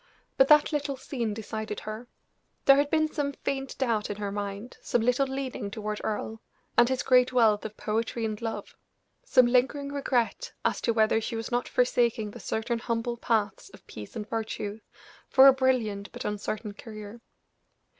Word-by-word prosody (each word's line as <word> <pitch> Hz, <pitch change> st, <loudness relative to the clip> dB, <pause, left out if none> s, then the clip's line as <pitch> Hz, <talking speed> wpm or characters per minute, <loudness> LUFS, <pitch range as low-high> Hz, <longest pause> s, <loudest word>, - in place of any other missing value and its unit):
But 270 Hz, -, +5 dB
that 300 Hz, +1 st, +6 dB
little 290 Hz, -2 st, -1 dB
scene 250 Hz, -4 st, -3 dB
decided 215 Hz, 0 st, -5 dB
her; 215 Hz, +3 st, -7 dB, 0.6 s
there 275 Hz, 0 st, +8 dB
had 285 Hz, 0 st, +2 dB
been 315 Hz, 0 st, +2 dB
some 290 Hz, -2 st, -2 dB
faint 270 Hz, 0 st, -4 dB
doubt 230 Hz, -6 st, 0 dB
in 205 Hz, -, -3 dB
her 205 Hz, -1 st, -4 dB
mind, 205 Hz, +3 st, -5 dB
some 240 Hz, -, 0 dB
little 250 Hz, +3 st, +2 dB
leaning 265 Hz, -5 st, -4 dB
toward 210 Hz, 0 st, -4 dB
Earle, 220 Hz, +1 st, -3 dB, 0.3 s
and 240 Hz, 0 st, +5 dB
his 260 Hz, -1 st, 0 dB
great 250 Hz, 0 st, +4 dB
wealth 225 Hz, -4 st, +4 dB
of 215 Hz, 0 st, -7 dB
poetry 225 Hz, +1 st, -2 dB
and 215 Hz, 0 st, -4 dB
love 225 Hz, -1 st, -5 dB, 0.5 s
some 255 Hz, -, +5 dB
lingering 265 Hz, +4 st, +1 dB
regret 275 Hz, -, -1 dB
as -, -, +1 dB
to -, -, +1 dB
whether 220 Hz, 0 st, +3 dB
she 230 Hz, -, -4 dB
was 225 Hz, +2 st, -4 dB
not 245 Hz, 0 st, 0 dB
forsaking 235 Hz, -3 st, +1 dB
the -, -, -10 dB
certain 230 Hz, +1 st, -2 dB
humble 230 Hz, +1 st, -2 dB
paths 215 Hz, -5 st, -1 dB
of -, -, -20 dB
peace 105 Hz, -1 st, -10 dB
and 210 Hz, -1 st, -5 dB
virtue 220 Hz, -2 st, -4 dB, 0.5 s
for 265 Hz, 0 st, +7 dB
a 270 Hz, -, +10 dB
brilliant 240 Hz, -7 st, 0 dB
but -, -, -7 dB
uncertain 210 Hz, +1 st, -3 dB
career. 215 Hz, +1 st, -10 dB
230 Hz, 175 wpm, -28 LUFS, 215-260 Hz, 0.6 s, a